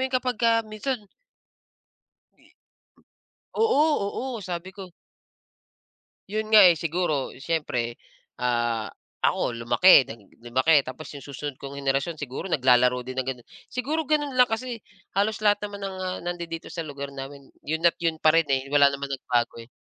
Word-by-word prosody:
yun 260 - -19
kapagka 235 -2 +2
minsan 215 +5 -3 2.6
Oo, 440 -10 +3 0.5
oo, 230 - -5
sabi 180 0 -5
ko 190 -2 -9 1.4
Yun 215 +1 -2
nga, 215 - +10
eh, 175 - +5
siguro 155 -4 -1
siyempre, 130 -6 -2 0.4
ah, 120 -2 0 0.4
ako - - +1
lumaki, 140 +4 +6
nagi 110 -3 -10 0.2
lumaki. 130 +6 +3
Tapos 135 +4 -8
yung 140 - -9
susunod 140 0 -6
kong 140 0 -7
henerasyon, 140 +4 -1
siguro 135 +1 -6
naglalaro 125 -3 +3
din 130 0 -7
ng - - -8
ganun. 125 -2 -6 0.2
Siguro 295 +6 -2
ganun 295 -2 +1
lang, 250 - +7
kasi 235 0 -4 0.4
halos 210 +2 +1
lahat 205 0 +4
naman 205 -1 -8
ng, 195 -1 -5
ah, 185 0 -3
nandidito 170 -2 -5
sa 170 - -3
lugar 140 -1 -7
namin 140 +1 -8 0.2
yun 160 +2 -3
at 170 - +6
yun 165 -1 0
pa 155 0 +4
rin, 165 -1 +4
eh. 135 0 +1
Wala 145 -1 +6
naman 140 0 -5
nagbago, 120 -3 0
eh. 115 - -14
155 Hz, 150 wpm, -25 LUFS, 130-205 Hz, 2.6 s, nga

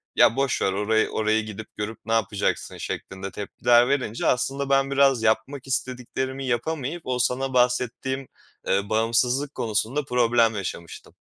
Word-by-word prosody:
"Ya, 115 - +5
boş 135 -1 0
ver 95 - +2
orayı, 110 +3 +1
oraya 110 0 +1
gidip, 110 0 -8
görüp 105 +1 -4
ne 115 - -1
yapacaksın?" 110 -2 -1
şeklinde 95 +1 -6
tepkiler 120 +4 +2
verince 130 -5 -1
aslında 135 +2 0
ben 135 0 +2
biraz 135 -4 +3
yapmak 115 +5 0
istediklerimi 130 +1 -3
yapamayıp 140 +5 -2
o 125 -1 -1
sana 130 +2 0
bahsettiğim, 125 +1 0 0.4
ııı, 100 +1 +1
bağımsızlık 120 +6 +1
konusunda 115 +6 -1
problem 120 -2 +3
yaşamıştım. 90 -4 -7
120 Hz, 140 wpm, -24 LUFS, 110-135 Hz, 0.4 s, Ya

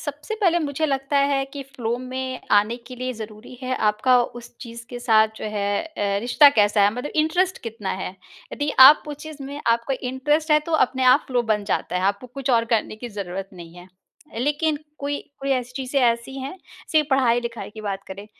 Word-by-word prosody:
सबसे 295 +8 -5
पहले 345 -3 +3
मुझे 305 0 -1
लगता 275 0 -1
है 270 -1 +1
कि 280 -1 -6
फ़्लो 245 -4 -4
में 255 0 -5
आने 210 +3 +3
के 255 - -9
लिए 255 +1 -3
ज़रूरी 220 +1 -10
है 255 0 -1
आपका 245 +4 +3 0.2
उस 240 - -12
चीज़ 235 -1 -9
के 245 - -6
साथ 220 -3 +4
जो - - -7
है 205 -1 -2 0.3
ए, 200 -1 0
रिश्ता 265 +6 +6
कैसा 210 -4 +3
है? 200 - +5
मतलब 250 +4 -5
इंटरेस्ट 355 +5 +1
कितना 220 -4 -5
है? 190 -1 -4 0.4
यदि 290 0 -2
आप 285 +4 +10
उस 295 - -5
चीज़ 300 -2 -9
में 285 +2 -7
आपको 235 +3 +1
इंटरेस्ट 270 +5 -1
है 300 - +6
तो - - -3
अपने 260 0 -3
आप 255 +3 +5
फ़्लो 245 -2 +1
बन 210 -1 -2
जाता 190 -2 -1
है। 180 - -1
आपको 200 +5 0
कुछ 260 +2 -4
और 230 -2 +3
करने 215 -1 0
की 240 +2 -7
ज़रूरत 195 -2 -5
नहीं 170 -2 -12
है। 175 +1 -13 0.5
लेकिन 295 +3 0 0.2
कोई 285 0 -2 0.2
कोई 275 0 -3
ऐसी 250 -1 -2
चीज़ें 270 +1 -1
ऐसी 235 +2 0
हैं 275 +8 -6 0.4
सिर्फ़ 305 -2 +4
पढ़ाई-लिखाई 240 -3 +1
की 215 +1 -10
बात 200 -2 -4
करें 200 +2 -8
250 Hz, 205 wpm, -23 LUFS, 215-280 Hz, 0.5 s, आप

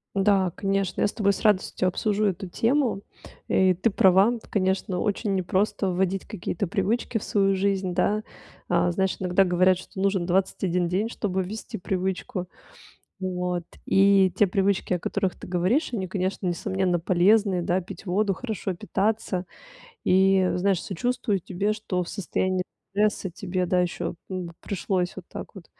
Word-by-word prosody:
Да, 195 -2 +3
конечно, 195 -1 -1
я - - +4
с - - -6
тобой 200 -2 +2
с - - -6
радостью 190 -3 +2
обсужу 210 +3 0
эту 190 -1 -1
тему. 230 +2 +1 0.5
Э, 190 -1 +4
и - - +3
ты 190 +6 +1
права. 200 +4 +4
Конечно, 190 -1 0
очень 205 -1 0
непросто 190 +2 0
вводить 190 +1 0
какие-то 200 -1 -3
привычки 225 +4 0
в - - -9
свою 195 -1 +2
жизнь, 190 -1 0
да. 210 +4 +1 0.5
А, 175 0 +2
знаешь, 190 +1 0
иногда 185 +1 +3
говорят, 180 0 +3
что 190 +1 -10
нужен 195 -3 +1
21 180 -1 +1
день, 200 +6 0
чтобы 190 -5 -2
ввести 215 +4 -6
привычку. 185 +2 -3 0.7
Вот. 180 -1 -2 0.2
И 195 -2 +4
те 205 - +4
привычки, 195 0 +1
о 180 - 0
которых 195 0 -1
ты - - -9
говоришь, 185 - +1
они, 190 -4 -2
конечно, 185 0 -2
несомненно, 180 0 0
полезные, 185 +2 +3
да, 175 +2 +1
пить 185 +2 -10
воду, 195 +2 +1
хорошо 215 -4 -4
питаться 195 -1 -1 0.6
и, 190 0 +4
знаешь, 190 0 +1
сочувствую 205 0 -1
тебе, 200 +4 -1
что 200 -4 -2
в 170 - -5
состоянии 185 0 -1 0.3
стресса 205 -1 0
тебе, 180 0 -3
да, 180 0 +2
еще, 175 0 -2 0.2
м, 185 -2 -4
пришлось 185 -2 -2
вот 190 - -9
так - - -8
вот, 185 -5 -11
190 Hz, 160 wpm, -25 LUFS, 180-200 Hz, 0.7 s, я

